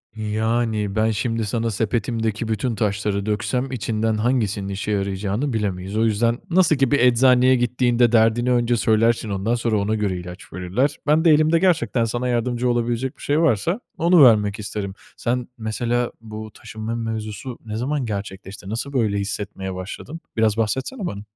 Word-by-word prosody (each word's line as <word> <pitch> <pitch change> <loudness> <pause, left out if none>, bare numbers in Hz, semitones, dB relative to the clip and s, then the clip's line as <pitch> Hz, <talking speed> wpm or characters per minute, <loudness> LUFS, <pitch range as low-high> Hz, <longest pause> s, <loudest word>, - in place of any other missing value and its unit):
Yani, 110 -1 -1
ben 110 +1 +2
şimdi 115 +1 -1
sana 115 +2 -1
sepetimdeki 110 +1 -1
bütün 110 +2 -1
taşları 100 -1 -1
döksem 125 +5 -1
içinden 110 -2 -1
hangisinin 105 -4 0
işe 100 +2 -3
yarayacağını 100 +6 -1
bilemeyiz. 100 -2 -2
O 115 - +3
yüzden 115 +3 +1
nasıl 175 -2 +4
ki 135 -1 +1
bir 145 - +3
eczaneye 125 +1 +5
gittiğinde 120 -1 +2
derdini 115 +2 +3
önce 120 -1 +2
söylersin, 115 0 +2
ondan 100 +4 0
sonra 115 -2 0
ona 105 +2 0
göre 100 -4 -1
ilaç 90 0 -10
verirler. 100 +11 -1
Ben 155 +3 +3
de 165 - +7
elimde 155 +2 +4
gerçekten 130 - +2
sana 120 +2 -2
yardımcı 120 +1 0
olabilecek 120 +2 -1
bir - - -16
şey 145 +2 +1
varsa 165 - +1 0.2
onu 170 -1 +6
vermek 105 -4 +4
isterim. 105 -2 -4 0.2
Sen 125 +1 -1
mesela 120 +2 -1
bu 110 -1 -8
taşınma 110 +2 -6
mevzusu 110 +1 -5
ne 105 -1 -5
zaman 135 +4 -1
gerçekleşti, 100 -2 -6
nasıl 120 +6 -4
böyle 110 -6 +1
hissetmeye 100 -1 -4
başladın? 100 - -7 0.2
Biraz 110 -1 +2
bahsetsene 130 - -2
bana. 100 - -4
115 Hz, 160 wpm, -22 LUFS, 105-125 Hz, 0.2 s, de